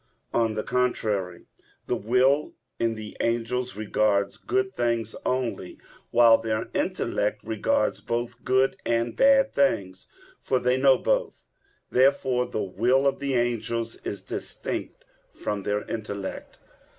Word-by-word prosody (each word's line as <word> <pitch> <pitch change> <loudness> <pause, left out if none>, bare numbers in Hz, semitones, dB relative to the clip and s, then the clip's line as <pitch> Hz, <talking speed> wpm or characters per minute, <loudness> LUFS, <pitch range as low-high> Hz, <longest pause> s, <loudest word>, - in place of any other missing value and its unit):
On 115 -2 +1
the 110 - -2
contrary, 105 -8 -1 0.4
The - - 0
will 130 +6 +2 0.2
in 115 -1 +1
the 110 -1 -8
angels 120 +1 -1
regards 100 -2 +1
good 385 0 -1
things 115 -2 -1
only, 125 -8 -2 0.3
while 115 -1 +6
their 110 -1 -2
intellect 105 +1 -1
regards 280 - 0
both 120 +1 -3
good 130 +1 +2
and 115 0 0
bad 270 0 +4
things, 100 - 0 0.3
for 130 - 0
they 125 0 +2
know 135 0 +5
both. - - -1 0.5
Therefore 130 -1 +3
the 110 - -2
will 120 +8 +2
of 135 -1 +1
the 140 -1 -1
angels 115 -1 -1
is 100 -2 -6
distinct - - -5 0.3
from 105 -1 -3
their 105 +1 -1
intellect. 100 -3 -6
115 Hz, 125 wpm, -26 LUFS, 110-130 Hz, 0.5 s, while